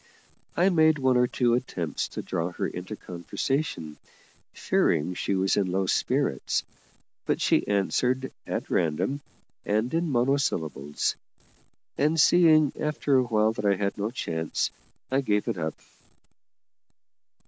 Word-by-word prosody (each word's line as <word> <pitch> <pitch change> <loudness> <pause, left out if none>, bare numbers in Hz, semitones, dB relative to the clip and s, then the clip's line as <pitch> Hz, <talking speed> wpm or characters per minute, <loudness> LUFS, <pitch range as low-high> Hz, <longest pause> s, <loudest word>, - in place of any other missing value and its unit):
I 180 +3 +4
made 160 -3 +4
one 130 -2 +2
or 125 0 +4
two 120 -1 +1
attempts 95 -10 -2
to - - -6
draw 85 +2 -2
her - - -2
into 90 +4 -6
conversation, 90 - -3 0.5
fearing 85 +5 +1
she 95 +2 -1
was 95 0 +2
in 95 -3 +1
low 95 +1 0
spirits, 65 - 0 0.6
but - - +1
she - - +2
answered 125 +6 0 0.2
at - - -4
random 90 - 0 0.4
and 110 +6 0
in 165 0 0
monosyllables; 120 - 0 0.8
and, 155 +3 +2
seeing 155 -2 +5
after 150 -2 0
a 130 - +4
while 110 -2 +2
that 105 -2 -5
I 100 -1 +4
had 100 +1 -2
no 105 +1 -2
chance, 80 -9 -2 0.4
I 135 +1 +2
gave 105 -5 0
it 90 - -2
up. 80 -1 -2
110 Hz, 135 wpm, -26 LUFS, 90-140 Hz, 0.8 s, seeing